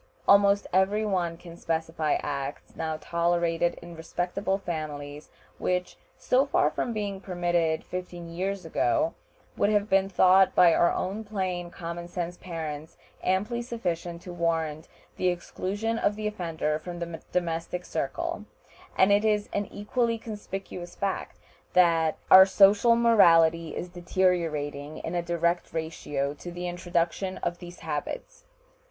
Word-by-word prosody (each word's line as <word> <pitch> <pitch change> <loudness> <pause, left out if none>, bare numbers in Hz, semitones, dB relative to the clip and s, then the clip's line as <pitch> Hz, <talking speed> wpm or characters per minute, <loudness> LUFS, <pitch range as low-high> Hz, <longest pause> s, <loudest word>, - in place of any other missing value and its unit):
Almost 200 0 +5
every 200 +3 +3
one 175 -5 -1
can 170 -1 -11
specify 160 -2 -1
acts 140 -1 -5
now 160 -1 -3
tolerated 170 0 +1
in 170 0 -10
respectable 180 +4 -2
families 150 -5 -6 0.3
which, 180 0 -1 0.2
so 265 +3 +2
far 150 - +2
from 235 - -2
being 205 -3 -3
permitted 175 -3 0
fifteen 180 -1 -6
years 185 +3 -3
ago, 330 -2 +1 0.4
would 200 - +2
have 210 0 +1
been 195 0 +3
thought 190 0 +5
by 170 -2 +7
our 170 - +4 0.3
plain 185 -4 -3
common 170 -1 -6
sense 175 0 -4
parents 160 -4 -6 0.3
amply 205 +6 0
sufficient 175 -8 -4
to 180 - -8
warrant 165 -2 -1 0.3
the 185 - +1
exclusion 200 +5 -2
of 205 - +1
the 215 0 -5
offender 165 -7 -2
from 175 +1 -7
the 170 -1 -6
domestic 175 0 -2
circle; - - -3 0.5
and 190 +2 +5
it 205 +1 +4
is 210 -1 +1
an 205 -1 -1
equally 230 +3 -1
conspicuous 195 -5 -7
fact 195 -1 -3 0.4
that 165 -3 +4
our 190 0 +10
social 200 +4 +6
morality 165 -8 +5
is 180 - -4
deteriorating 165 -5 -1
in 165 - -5
a 175 - 0
direct 170 0 0
ratio 150 -3 -3
to 175 +4 -9
the 175 +1 -5
introduction 175 +1 -1
of 175 0 -2
these 175 0 -11
habits. - - -5
175 Hz, 135 wpm, -27 LUFS, 165-200 Hz, 0.5 s, our